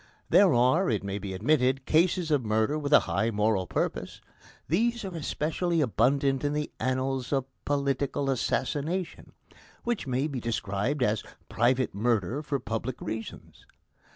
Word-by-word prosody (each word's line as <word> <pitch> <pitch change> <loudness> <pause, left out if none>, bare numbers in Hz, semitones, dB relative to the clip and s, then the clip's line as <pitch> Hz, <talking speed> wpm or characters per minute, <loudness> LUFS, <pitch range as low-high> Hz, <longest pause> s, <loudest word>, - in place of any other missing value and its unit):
There 195 -3 +6
are, 130 +10 +3
it - - 0
may 100 0 -3
be 100 -1 -5
admitted, 130 +4 +2
cases 170 0 +2
of 145 -4 +2
murder 110 +7 +1
with 145 -1 -3
a 150 - +8
high 100 +6 0
moral 105 -3 +1
purpose. - - -3 0.5
These 230 - +1
are 185 -2 -6
especially 165 +2 -1
abundant 135 +1 +2
in 145 0 0
the 150 0 -2
annals 130 0 -1
of 135 -2 +1 0.2
political 140 -1 0
assassination, 155 +7 -2 0.5
which 240 -10 -2
may 130 +2 0
be 140 -4 -3
described 115 +3 -1
as 105 -3 +1 0.3
private 125 +1 +1
murder 115 +4 0
for 145 -2 -2
public 115 +1 -4
reasons. 110 0 -7
135 Hz, 145 wpm, -28 LUFS, 115-150 Hz, 0.5 s, a